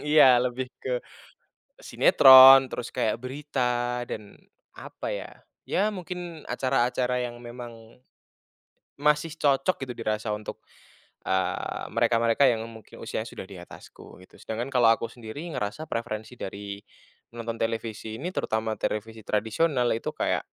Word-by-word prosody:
iya, 135 -5 +6
lebih 125 +1 -2
ke - - -2 0.8
sinetron 135 - +8
terus 125 -1 -6
kayak 110 +1 -1
berita 125 -3 -2
dan 105 -2 -8 0.4
apa - - -7
ya, - - -6 0.4
ya 205 +3 +1
mungkin 180 -4 -7
acara-acara 125 -1 0
yang 120 0 -7
memang 120 -1 -11 1.0
masih 150 +1 +2
cocok 140 +2 +1
gitu 125 - -6
dirasa 110 -1 -2
untuk, 105 0 -6 0.7
eee, 95 -1 -1
mereka-mereka 115 +4 +3
yang 115 -2 -1
mungkin 110 -2 -14
usianya - - -4
sudah - - -8
di 95 -2 -11
atasku - - -14
gitu. - - -20
Sedangkan 115 +4 -4
kalau 120 -2 +5
aku 115 - -3
sendiri 120 +5 -9
ngerasa 105 +9 -4
preferensi 115 0 -4
dari 100 +1 -6 0.6
nonton 115 0 -5
televisi 115 -1 -3
ini 170 +9 -4
terutama 110 0 -1
televisi 110 +1 -3
tradisional 120 +5 +1
itu 115 - -3
kayak, - - 0
120 Hz, 130 wpm, -26 LUFS, 110-135 Hz, 1.0 s, sinetron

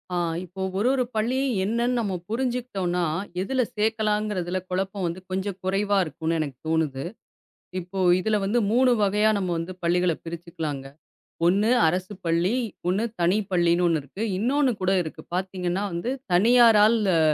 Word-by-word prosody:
ஆ, - - 0 0.3
இப்போ 185 +2 -9 0.2
ஒரு 210 +5 +1
ஒரு 265 -2 +2
பள்ளியும் 255 +5 0
என்னன்னு 235 +4 0
நம்ம 200 -4 -2 0.2
புரிஞ்சுக்கிட்டோம்னா, 230 -7 -1 0.4
எதுல 260 +7 0 0.2
சேக்கலாம்ங்கிறதுல 210 -4 0
குழப்பம் 190 +1 -2
வந்து 170 +2 -4
கொஞ்சம் 190 0 -2
குறைவா 200 +2 +1
இருக்கும்னு 160 +2 -2
எனக்கு 140 -5 -3
தோணுது. 155 -4 0 0.8
இப்போ 180 +2 -8 0.2
இதுல 215 +2 +1
வந்து 210 +5 +1
3 255 +2 +4
வகையா 210 +2 +3
நம்ம 185 -2 -2
வந்து 165 +3 -4
பள்ளிகளைப் 175 -1 +1
பிரிச்சுக்கலாங்க. 160 -4 -5 0.6
ஒண்ணு 200 +5 +3 0.2
அரசுப் 185 +3 -2
பள்ளி, 170 +5 +1 0.3
ஒண்ணு 190 +5 +1 0.2
தனிப்பள்ளின்னு 180 -2 +2
ஒண்ணு 165 -2 +2
இருக்கு. 140 +9 -10 0.2
இன்னொண்ணு 265 +6 +2
கூட 185 0 +2
இருக்கு. 155 - -8
பாத்தீங்கன்னா 185 0 -2
வந்து 170 +8 -3 0.2
தனியாரால் 225 +2 +6 0.2
அ - - +4
190 Hz, 140 wpm, -25 LUFS, 175-215 Hz, 0.8 s, தனியாரால்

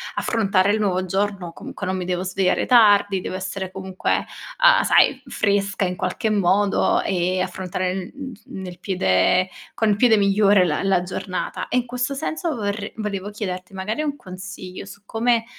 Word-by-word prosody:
affrontare 200 -3 +2
il 220 - 0
nuovo 185 -3 +1
giorno, 195 -1 -2
comunque 200 - -7
non 185 0 -1
mi 180 - -4
devo 180 0 -1
svegliare 185 0 +1
tardi, 205 -5 +5
devo - - -5
essere 190 0 -4
comunque, 190 0 -1 0.4
uhm, - - +6
sai - - +4
fresca 200 -1 0
in 180 - -2
qualche 185 +5 -2
modo 200 0 +2
e 185 0 0
affrontare, 185 0 -3
uhm 280 0 -8 0.2
uhm, 190 - -8
nel 180 -1 -8
piede 185 - +2 0.3
con 220 - +1
il 205 - +3
piede 240 -2 +5
migliore 200 -1 +4
la 155 0 -1
la 195 -2 +2
giornata. 185 0 -4
E - - +1
in 245 - +1
questo 250 +3 -2
senso, 315 +2 -2
vorre 205 -2 -3
volevo 205 -2 -4
chiederti 185 -2 -5
magari 210 +10 -3
un 290 -2 -2
consiglio 185 -3 -9
su 200 - -12
come, 230 0 +1
195 Hz, 170 wpm, -22 LUFS, 185-210 Hz, 0.4 s, uhm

